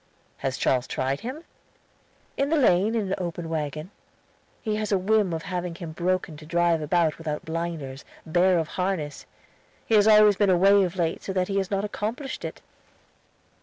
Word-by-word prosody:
"Has 135 Hz, -1 st, -3 dB
Charles 130 Hz, -1 st, +1 dB
tried 135 Hz, +1 st, -1 dB
him?" 260 Hz, +8 st, -6 dB, 0.9 s
"In 275 Hz, +1 st, 0 dB
the 325 Hz, -, +2 dB
lane 215 Hz, -4 st, +3 dB
in 210 Hz, -4 st, -1 dB
an -, -, +1 dB
open 175 Hz, -2 st, -4 dB
wagon. 155 Hz, +2 st, -4 dB, 0.7 s
He 215 Hz, -2 st, -1 dB
has 215 Hz, 0 st, -3 dB
a 200 Hz, -, +4 dB
whim 205 Hz, 0 st, +2 dB
of 160 Hz, -1 st, -3 dB
having 180 Hz, -2 st, -4 dB
him 170 Hz, -2 st, -7 dB
broken 175 Hz, -1 st, -1 dB
to 155 Hz, -, -12 dB
drive 170 Hz, 0 st, +2 dB
without 155 Hz, -1 st, 0 dB
blinders, 160 Hz, -5 st, -4 dB, 0.2 s
bare 175 Hz, +3 st, +3 dB
of 160 Hz, -2 st, -1 dB
harness; 180 Hz, -6 st, -3 dB, 0.6 s
he -, -, -2 dB
has 210 Hz, -1 st, +6 dB, 0.3 s
been 205 Hz, -2 st, +3 dB
away 185 Hz, +2 st, +5 dB
so 200 Hz, -1 st, +6 dB
of 180 Hz, 0 st, -5 dB
late 165 Hz, -3 st, -1 dB
that 185 Hz, -2 st, -1 dB
he 200 Hz, -, -1 dB
has 190 Hz, -1 st, -2 dB
not 200 Hz, 0 st, -1 dB
accomplished 225 Hz, +6 st, -4 dB
it." -, -, -6 dB
180 Hz, 170 wpm, -25 LUFS, 160-200 Hz, 0.9 s, has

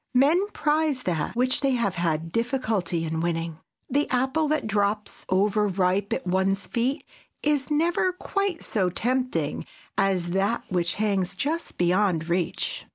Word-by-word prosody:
Men 315 Hz, +10 st, +4 dB
prize 300 Hz, -7 st, 0 dB
that 165 Hz, 0 st, -1 dB
which 255 Hz, +2 st, +1 dB
they 275 Hz, -2 st, +2 dB
have 230 Hz, -7 st, +1 dB
had 165 Hz, -1 st, -1 dB
difficulty 220 Hz, -8 st, 0 dB
in 160 Hz, 0 st, -2 dB
winning. 165 Hz, -1 st, -2 dB, 0.3 s
The 285 Hz, +3 st, +1 dB
apple 265 Hz, +5 st, +1 dB
that 305 Hz, -3 st, 0 dB
drops, 210 Hz, 0 st, -1 dB
over 205 Hz, +2 st, +2 dB
ripe, 190 Hz, +1 st, +1 dB
at -, -, -1 dB
one's 190 Hz, +2 st, +1 dB
feet 255 Hz, +5 st, -1 dB, 0.4 s
is 290 Hz, -3 st, +1 dB
never 335 Hz, +4 st, +2 dB
quite 395 Hz, -1 st, -2 dB
so 190 Hz, -4 st, +1 dB
tempting 255 Hz, +7 st, -1 dB, 0.4 s
as 185 Hz, -3 st, +1 dB
that 200 Hz, +5 st, +1 dB
which 175 Hz, -1 st, 0 dB
hangs 195 Hz, -3 st, 0 dB
just 320 Hz, -, -2 dB
beyond 175 Hz, -2 st, +2 dB
reach. 175 Hz, 0 st, -1 dB
210 Hz, 145 wpm, -26 LUFS, 180-270 Hz, 0.4 s, Men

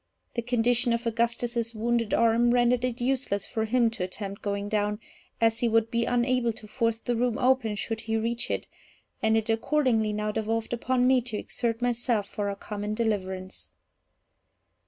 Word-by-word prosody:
The 235 Hz, -, -1 dB
condition 240 Hz, 0 st, +2 dB
of 235 Hz, +1 st, -2 dB
Augustus's 235 Hz, 0 st, 0 dB
wounded 230 Hz, 0 st, 0 dB
arm 230 Hz, +1 st, +4 dB
rendered 245 Hz, 0 st, +3 dB
it 250 Hz, -1 st, -1 dB
useless 245 Hz, -6 st, 0 dB
for 220 Hz, -1 st, -2 dB
him 235 Hz, 0 st, +2 dB
to 220 Hz, -5 st, -4 dB
attempt 195 Hz, +2 st, -5 dB
going 200 Hz, 0 st, -2 dB
down, 210 Hz, 0 st, 0 dB, 0.4 s
as 225 Hz, 0 st, +3 dB
he 240 Hz, -, +2 dB
would 225 Hz, 0 st, +2 dB
be 235 Hz, 0 st, +1 dB
unable 245 Hz, -1 st, +1 dB
to 215 Hz, -, -7 dB
force 230 Hz, 0 st, 0 dB
the 240 Hz, +1 st, -2 dB
room 240 Hz, -1 st, +1 dB
open 250 Hz, -4 st, +2 dB
should 225 Hz, +2 st, -3 dB
he 225 Hz, 0 st, -1 dB
reach 230 Hz, +2 st, -2 dB
it, -, -, -2 dB, 0.6 s
and 220 Hz, -1 st, +3 dB
it 220 Hz, -, -1 dB
accordingly 225 Hz, -1 st, +2 dB
now 210 Hz, 0 st, -1 dB
devolved 225 Hz, +1 st, -2 dB
upon 250 Hz, +1 st, +1 dB
me 255 Hz, 0 st, +5 dB
to 230 Hz, -3 st, -4 dB
exert 230 Hz, +2 st, -2 dB
myself 240 Hz, -3 st, 0 dB
for 205 Hz, 0 st, -3 dB
our 200 Hz, -, -3 dB
common 210 Hz, +1 st, -4 dB
deliverance. 190 Hz, -4 st, -3 dB
230 Hz, 175 wpm, -27 LUFS, 215-240 Hz, 0.6 s, me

